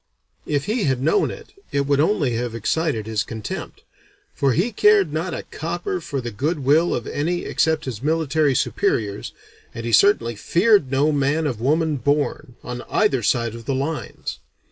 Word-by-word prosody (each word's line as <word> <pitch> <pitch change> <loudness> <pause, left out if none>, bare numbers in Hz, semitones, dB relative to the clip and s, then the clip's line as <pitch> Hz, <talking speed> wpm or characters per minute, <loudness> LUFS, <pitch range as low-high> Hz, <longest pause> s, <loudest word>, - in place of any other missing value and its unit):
If 145 -2 0
he 215 0 0
had 130 -2 +1
known 270 - +2
it, - - -10 0.2
it 140 - +1
would 140 0 +1
only 155 -4 +2
have 115 0 -3
excited 125 0 -1
his 110 0 -1
contempt, 110 -1 -7 0.5
for 135 -2 +1
he 190 - +1
cared 205 -6 +4
not 165 +3 -2
a - - -5
copper 175 +3 -3
for 140 -3 -4
the 120 -2 -5
good 145 +11 -1
will 160 +5 +4
of 120 - -4
any 175 +4 -2
except 160 -1 +1
his 120 -5 -5
military 155 -1 +1
superiors, 105 -3 -1 0.4
and 115 0 +2
certainly 120 - +3
feared 180 - +3
no 140 +3 +2
man 145 +2 +1
of 120 -7 -2
woman 155 +3 +1
born, 145 0 -1
on 125 0 -5
either 205 - +2
side 115 +1 +1
of 115 -1 -9
the 135 - -1
lines. 145 +4 -4
145 Hz, 170 wpm, -22 LUFS, 120-160 Hz, 0.5 s, cared